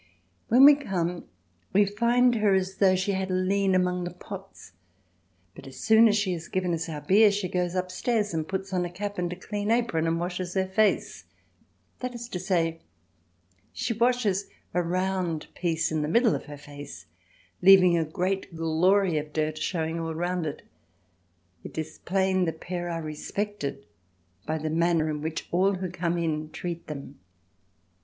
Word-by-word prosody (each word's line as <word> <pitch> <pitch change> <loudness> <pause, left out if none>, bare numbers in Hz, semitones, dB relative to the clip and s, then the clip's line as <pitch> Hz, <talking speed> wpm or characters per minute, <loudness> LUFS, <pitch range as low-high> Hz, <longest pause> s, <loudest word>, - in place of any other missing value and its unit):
When 250 +4 +7
we 295 - +10
come 180 -11 -2 0.5
we 205 +1 +5
find 235 +5 +3
her 210 -4 +3
as 190 0 -1
though 190 -2 +4
she 185 +2 0
had 190 -1 -2
lien 190 +1 +1
among 180 -1 +1
the 175 - -3
pots, 195 - -10 0.8
but 135 - -12
as 130 -1 -11
soon 220 +1 +6
as 210 0 +3
she 200 -3 0
has 165 -1 -6
given 185 -2 -1
us 165 0 -3
our 150 -2 -5
beer, 200 +7 +5
she 200 -2 -2
goes 180 0 -1
upstairs 205 +3 -1
and 160 -1 -2
puts 195 0 -4
on 180 -1 +1
a 175 - -3
cap 205 +2 -5
and 175 -1 -1
a - - -4
clean 205 +3 -4
apron 230 -9 +1
and 165 0 0
washes 180 +1 -4
her 190 0 +2
face—that 215 +4 -3
is 235 0 -7
to 180 - -4
say, 170 -3 0 0.9
she 250 -2 -2
washes 225 -4 +1 0.3
a 180 - +2
round 180 -2 -1
piece 165 -2 -1
in 155 -1 0
the 150 - -1
middle 230 +7 +3
of - - -4
her 145 -1 -9
face, 145 -6 -10 0.6
leaving 185 -2 +7
a 165 - +2
great 185 +3 -2
glory 165 +2 +2
of 150 0 -8
dirt 155 0 -1
showing 165 -1 -2
all 165 -1 -3
round 175 0 -1
it. 145 - -6 1.0
It - - -10
is 155 0 -5
plain 190 0 +1
the 165 - -1
pair 175 +2 -5
are 165 -1 -3
respected 155 -2 -4 0.6
by 155 - 0
the 155 0 -3
manner 165 -1 +2
in 150 -1 -4
which 160 +1 -4
all 190 +3 +3
who 185 -1 -4
come 175 -1 -1
in 155 -2 -2
treat 170 +1 -6
them. 140 -2 -8
180 Hz, 175 wpm, -27 LUFS, 165-195 Hz, 1.0 s, we